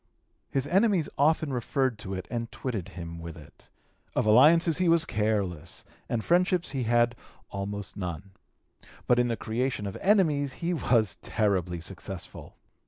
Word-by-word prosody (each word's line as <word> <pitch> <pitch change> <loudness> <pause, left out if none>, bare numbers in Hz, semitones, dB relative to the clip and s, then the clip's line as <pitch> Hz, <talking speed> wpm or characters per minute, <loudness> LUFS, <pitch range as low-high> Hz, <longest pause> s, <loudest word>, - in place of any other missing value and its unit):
His 135 -1 0
enemies 190 +1 +2
often 150 0 +2
referred 125 -1 0
to 95 -1 -5
it 95 -1 -6
and 115 -1 -3
twitted 105 -8 -4
him 85 -1 -6
with 85 -1 -8
it. 75 - -16 0.5
Of - - +1
alliances 155 +10 +5
he 180 -2 +3
was 165 -1 +4
careless, 105 - -1 0.2
and 115 -2 -1
friendships 180 -2 +2
he 135 -3 -2
had 120 +1 +3 0.4
almost 100 0 -5
none. 90 0 -5 0.7
But 125 0 +3
in 120 - +3
the 115 -1 -1
creation 120 -1 -2
of 100 - -5
enmities 155 -9 +3
he 175 +1 -2
was 115 - +2
terribly 95 -5 0
successful. 95 +2 -8
120 Hz, 150 wpm, -28 LUFS, 100-150 Hz, 0.7 s, alliances